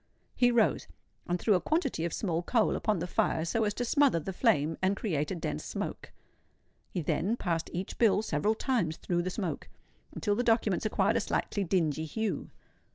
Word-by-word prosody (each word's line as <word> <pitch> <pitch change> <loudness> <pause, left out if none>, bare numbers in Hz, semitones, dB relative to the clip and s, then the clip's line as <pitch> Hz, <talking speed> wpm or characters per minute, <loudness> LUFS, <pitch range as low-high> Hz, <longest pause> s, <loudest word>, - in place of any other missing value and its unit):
He 245 - +4
rose 235 -2 +2 0.4
and 175 0 0
threw 215 - +3
a 180 - +2
quantity 275 - 0
of 170 - -2
small 170 -3 -1
coal 225 +5 +2
upon 215 -3 0
the 170 - -2
fire, 165 -2 0
so 220 +6 +1
as 205 - -1
to 245 - -1
smother 275 - +3
the 190 +5 -5
flame, 165 - +2
and 190 +1 +1
create 155 -9 -1
a - - -2
dense 75 - -4
smoke. - - -5 0.8
He 175 - -3
then 200 +9 0
passed 165 -6 -2
each 185 +2 -5
bill 215 -3 +4
several 210 +4 +1
times 220 - 0
through 175 -1 -1
the 180 - -2
smoke, 185 -3 -4 0.4
until 205 - -1
the 210 - +1
documents 225 -4 +2
acquired 205 +1 +2
a - - +1
slightly 205 0 -1
dingy 160 -4 0
hue. 220 +6 -3
195 Hz, 190 wpm, -30 LUFS, 170-225 Hz, 0.8 s, He